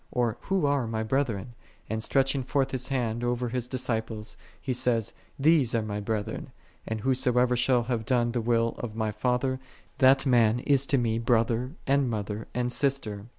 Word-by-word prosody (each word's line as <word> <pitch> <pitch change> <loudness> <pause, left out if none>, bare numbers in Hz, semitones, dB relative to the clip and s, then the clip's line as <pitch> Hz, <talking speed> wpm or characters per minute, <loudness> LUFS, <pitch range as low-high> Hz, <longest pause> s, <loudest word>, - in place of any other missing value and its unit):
or 120 -3 0
who 190 -5 0
are 140 -4 +1
My 110 0 -2
brethren? 120 -3 -1 0.3
and 110 +1 -3
stretching 135 +3 +1
forth*His 130 -1 0
Hand 120 -4 -1
over 120 0 -1
His 125 0 -2
disciples, 110 -4 -2 0.2
He 130 - -2
saith, 120 -3 0 0.2
These 140 -4 +3
are 115 - +1
My 105 -1 -3
brethren: 105 0 -3 0.4
and 110 -1 -3
who 130 +4 +2
soever 125 -1 +2
shall 125 0 +2
have 120 -2 -2
done 120 0 +2
the 120 0 -1
will 115 0 +2
of 110 -3 -5
My 110 -1 -1
Father, 125 +4 0 0.4
that 135 +1 +5
man 120 -3 +4
is 140 -1 +2
to 140 - +2
Me 115 -2 0
brother, 115 +2 +1
and 140 -1 +2
mother, 105 -1 -4
and 125 0 0
sister.'" 120 -7 -1
120 Hz, 175 wpm, -27 LUFS, 110-130 Hz, 0.4 s, that